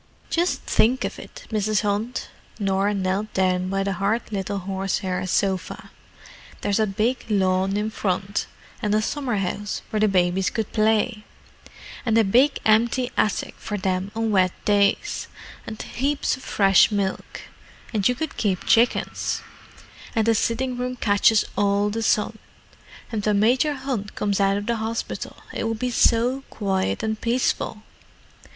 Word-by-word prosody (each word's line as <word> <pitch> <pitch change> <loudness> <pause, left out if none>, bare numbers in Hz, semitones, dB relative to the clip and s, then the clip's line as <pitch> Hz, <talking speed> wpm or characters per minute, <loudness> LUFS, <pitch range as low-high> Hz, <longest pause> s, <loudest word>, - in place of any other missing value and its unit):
"Just 345 +2 +1
think 250 +4 +2
of - - -5
it, - - -11
Mrs. 215 -1 +1
Hunt!" 210 +4 -2 0.3
Norah 195 0 +1
knelt 195 +2 -1
down 185 -1 +1
by 195 0 0
the 195 0 -1
hard 205 +5 -1
little 200 0 -2
horsehair 190 -1 -2
sofa. 190 0 -1 0.7
"There's 205 +1 +1
a 215 - +3
big 220 +6 0
lawn 190 -1 +2
in 215 +1 -1
front, 200 -1 -2 0.3
and 210 0 +1
a 215 - +3
summer 265 -2 -2
house 200 +1 -3
where 215 - 0
the 215 - +4
babies 185 -1 +2
could 220 -3 -3
play, 215 0 +2 0.8
and 225 -2 +2
a 225 - +6
big 250 +8 +4
empty 235 +3 +3
attic 210 - 0
for 210 - -4
them 185 0 -1
on 225 -1 0
wet 185 -3 +3
days, 200 -1 +2 0.4
and 220 -1 -6
heaps 280 +3 -1
of 260 - -13
fresh 195 -6 +4
milk, 200 -2 -2 0.5
and 205 -3 +2
you 250 - +1
could 315 +3 -4
keep 195 -4 0
chickens; 235 +2 +2 0.7
and 225 -1 +2
the 230 - +4
sitting 245 +3 0
room 250 0 -2
catches 210 -1 +3
all 205 0 +2
the 225 +2 -2
sun, 220 0 +1 0.7
and 215 -3 -2
when 210 -1 +2
Major 255 +7 +3
Hunt 260 -7 -4
comes 205 -1 0
out 195 0 +3
of 205 - -4
the 235 +1 0
hospital 225 +1 -4 0.2
it - - -2
would 225 0 -1
be 250 +2 -2
so 240 +3 +3
quiet 195 0 -1
and 220 0 -2
peaceful. 235 -2 0
210 Hz, 155 wpm, -23 LUFS, 195-230 Hz, 0.8 s, a